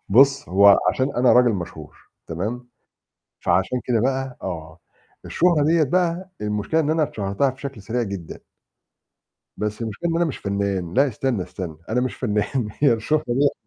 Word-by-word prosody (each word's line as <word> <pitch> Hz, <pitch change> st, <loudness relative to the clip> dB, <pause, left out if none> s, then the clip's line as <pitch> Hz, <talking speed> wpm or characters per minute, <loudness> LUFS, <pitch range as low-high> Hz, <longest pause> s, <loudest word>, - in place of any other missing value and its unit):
بُص، 140 Hz, +6 st, +4 dB
هو 100 Hz, +1 st, +6 dB
عشان 130 Hz, +8 st, -1 dB
أنا 125 Hz, 0 st, +5 dB
راجل 125 Hz, -1 st, +5 dB
مشهور 85 Hz, -6 st, -7 dB, 0.3 s
تمام؟ 110 Hz, +9 st, -4 dB, 0.7 s
فعشان 125 Hz, -1 st, +1 dB
كده 120 Hz, -3 st, +1 dB
بقى 130 Hz, +1 st, -1 dB
آه. 80 Hz, -3 st, -6 dB, 0.5 s
الشهرة 165 Hz, -4 st, +2 dB
ديّة 165 Hz, +1 st, +3 dB
بقى 180 Hz, +4 st, 0 dB
المشكلة 105 Hz, +9 st, 0 dB
إن 150 Hz, -, 0 dB
أنا 160 Hz, 0 st, +2 dB
اتشهرتها 105 Hz, 0 st, 0 dB
بشكل 135 Hz, -3 st, -8 dB
سريع 115 Hz, +4 st, -2 dB
جدًا. 95 Hz, -6 st, -6 dB, 1.2 s
بس 105 Hz, +2 st, -3 dB
المشكلة 115 Hz, +10 st, -3 dB
إن 165 Hz, -, 0 dB
أنا 170 Hz, -, +2 dB
مش 155 Hz, -, -4 dB
فنان، 100 Hz, -3 st, -2 dB
لأ 140 Hz, +3 st, +4 dB
استنى، 120 Hz, -3 st, -1 dB
استنى، 90 Hz, -3 st, -7 dB
أنا 120 Hz, +3 st, +1 dB
مش 125 Hz, -4 st, -2 dB
فنان، 105 Hz, +4 st, -1 dB
هي 140 Hz, -3 st, +4 dB
الشهرة 130 Hz, +7 st, 0 dB
ديّة 135 Hz, +4 st, 0 dB
120 Hz, 160 wpm, -22 LUFS, 100-140 Hz, 1.2 s, هو